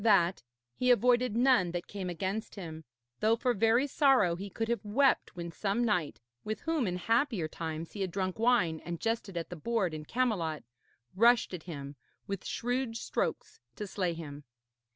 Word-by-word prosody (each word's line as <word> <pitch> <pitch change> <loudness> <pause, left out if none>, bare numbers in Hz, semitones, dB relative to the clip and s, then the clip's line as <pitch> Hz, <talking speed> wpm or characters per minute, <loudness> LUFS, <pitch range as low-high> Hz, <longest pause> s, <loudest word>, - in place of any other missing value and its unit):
After - - -7
that 185 - +4 0.3
he 250 - 0
avoided 245 -1 +4
none 245 -7 +4
that 175 - -3
came 195 -3 -5
against 190 +6 -3
him, 160 -5 -7 0.3
though 220 +1 +4
for 245 +1 +1
very 230 +5 +3
sorrow 270 - +4
he 195 +3 -6
could 225 +4 -3
have 235 0 -1
wept 255 +4 +2
when 170 -1 -5
some 205 +6 0
knight, 180 -10 0 0.2
with 215 0 -4
whom 320 -8 0
in 180 - -1
happier 225 - +1
times 160 0 -5
he 205 - -6
had 190 - 0
drunk 185 +2 -2
wine 220 -10 +3
and 170 -1 -5
jested 225 -5 -2
at 170 - -4
the - - -4
board 190 0 0
in 155 -1 -6
Camelot, 190 -10 0 0.5
rushed 235 +1 +4
at 180 - -4
him 140 -3 -6 0.3
with 195 -1 -5
shrewd 245 -1 -1
strokes - - -3 0.2
to 210 - -4
slay 185 -4 -1
him. 150 -3 -8
200 Hz, 180 wpm, -31 LUFS, 170-235 Hz, 0.5 s, that